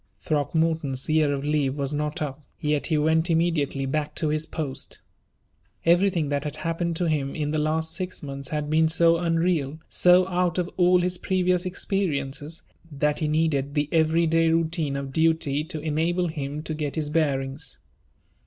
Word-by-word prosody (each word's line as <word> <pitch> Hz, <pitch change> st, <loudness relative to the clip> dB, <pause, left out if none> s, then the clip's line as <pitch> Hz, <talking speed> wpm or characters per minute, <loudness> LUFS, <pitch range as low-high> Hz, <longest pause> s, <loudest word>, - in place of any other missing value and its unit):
Throckmorton's 155 Hz, -2 st, 0 dB
year 155 Hz, -2 st, +3 dB
of 140 Hz, -1 st, -2 dB
leave 145 Hz, -2 st, 0 dB
was 140 Hz, 0 st, -2 dB
not 150 Hz, +1 st, -2 dB
up, 140 Hz, 0 st, -5 dB, 0.2 s
yet 150 Hz, -1 st, 0 dB
he 155 Hz, -, +1 dB
went 160 Hz, +3 st, +2 dB
immediately 160 Hz, -5 st, +1 dB
back 150 Hz, +2 st, -2 dB
to 155 Hz, -, -1 dB
his 155 Hz, +1 st, -1 dB
post. 145 Hz, -6 st, -5 dB, 0.9 s
Everything 175 Hz, -2 st, +3 dB
that 145 Hz, -1 st, -1 dB
had 150 Hz, -1 st, -3 dB
happened 165 Hz, +2 st, -2 dB
to 175 Hz, +1 st, 0 dB
him 145 Hz, -3 st, -1 dB
in 150 Hz, -2 st, -2 dB
the 155 Hz, -, 0 dB
last 160 Hz, +1 st, -1 dB
six 185 Hz, -2 st, -5 dB
months 140 Hz, -2 st, -6 dB
had 150 Hz, -1 st, -2 dB
been 160 Hz, +1 st, +3 dB
so 165 Hz, +1 st, +4 dB
unreal, 165 Hz, -3 st, 0 dB
so 180 Hz, +1 st, +5 dB
out 180 Hz, -1 st, 0 dB
of 180 Hz, -1 st, 0 dB
all 180 Hz, 0 st, +4 dB
his 180 Hz, 0 st, -1 dB
previous 180 Hz, -1 st, +1 dB
experiences, 160 Hz, -5 st, -2 dB, 0.3 s
that 150 Hz, +1 st, 0 dB
he 155 Hz, -, 0 dB
needed 150 Hz, -2 st, 0 dB
the 145 Hz, -1 st, +1 dB
every 165 Hz, +1 st, +3 dB
day 165 Hz, 0 st, +3 dB
routine 160 Hz, -3 st, 0 dB
of 140 Hz, -1 st, -5 dB
duty 160 Hz, -2 st, +1 dB
to 160 Hz, -1 st, -5 dB
enable 165 Hz, +3 st, 0 dB
him 150 Hz, -1 st, -4 dB
to 160 Hz, -, -4 dB
get 150 Hz, -2 st, -3 dB
his 150 Hz, -2 st, -2 dB
bearings. 140 Hz, -2 st, -1 dB
155 Hz, 170 wpm, -25 LUFS, 145-165 Hz, 0.9 s, so